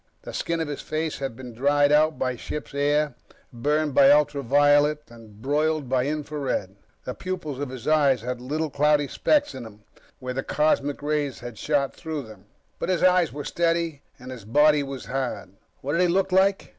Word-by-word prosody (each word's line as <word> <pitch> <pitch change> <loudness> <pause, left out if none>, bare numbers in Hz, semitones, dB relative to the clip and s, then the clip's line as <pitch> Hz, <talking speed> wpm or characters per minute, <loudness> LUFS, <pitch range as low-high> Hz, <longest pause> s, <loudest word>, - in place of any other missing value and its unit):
The - - -8
skin 170 0 -2
of 160 - -2
his 145 -1 -5
face 155 0 -3
had 135 -4 -4
been 125 -1 -9
dried 145 +4 +2
out 155 +1 +3
by 130 -1 -1
ship's 145 +5 -7
air, 145 +1 +1 0.4
burned 150 +4 0
by 140 0 +6
ultraviolet 145 +1 +3
and 110 -3 -15
broiled 150 +1 0
by 130 0 +1
infra 150 0 -4
red. 100 -8 -2 0.3
The 125 - -4
pupils 175 -7 -5
of 145 -2 -3
his 130 -3 -8
eyes 145 -6 +3
had 125 0 -4
little 150 +4 -3
cloudy 145 0 +2
specks 290 - +1
in 130 - -7
them 110 -2 -12 0.3
where 130 -1 -5
the 135 - -2
cosmic 145 -1 0
rays 145 -2 -1
had 120 -3 -8
shot 145 -3 0
through 160 -4 -5
them. 110 -4 -14 0.3
But - - -3
his 180 -2 +1
eyes 180 -3 +4
were 145 0 -6
steady 165 -3 -1 0.2
and 125 +1 -10
his 125 -4 -9
body 150 +7 +4
was 135 -2 -6
hard. 130 -7 -4 0.3
What 140 - -3
did 165 +4 +1
he 180 - +4
look 190 +2 +1
like? 190 +1 +2
145 Hz, 195 wpm, -25 LUFS, 130-155 Hz, 0.4 s, by